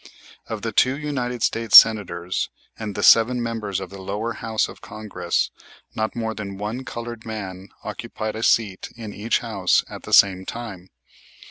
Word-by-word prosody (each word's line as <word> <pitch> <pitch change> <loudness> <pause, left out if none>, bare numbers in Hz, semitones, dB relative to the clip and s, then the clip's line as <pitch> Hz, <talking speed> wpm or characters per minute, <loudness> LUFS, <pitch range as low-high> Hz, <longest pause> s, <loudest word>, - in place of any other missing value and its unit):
Of 110 -2 -5
the 115 - -2
two 130 +5 +3
United 130 -5 -3
States 115 -2 +6
Senators 90 -5 +4 0.3
and 105 -3 -6
the - - -2
seven 120 +2 +6
members 115 -5 -3
of 95 -2 -8
the 100 -1 -9
lower 105 +5 -3
house 110 0 -1
of - - -12
Congress 100 -5 -2 0.4
not 110 -1 -2
more 110 -1 -2
than 100 -3 -6
one 110 +6 -4
colored 120 -2 -6
man 95 -4 -7
occupied 110 0 -5
a 110 - -4
seat 105 -4 +1
in 110 -3 -7
each 110 +3 0
house - - +1
at - - -9
the - - -10
same 95 -2 +6
time. 100 -4 -7
110 Hz, 165 wpm, -23 LUFS, 100-115 Hz, 0.4 s, States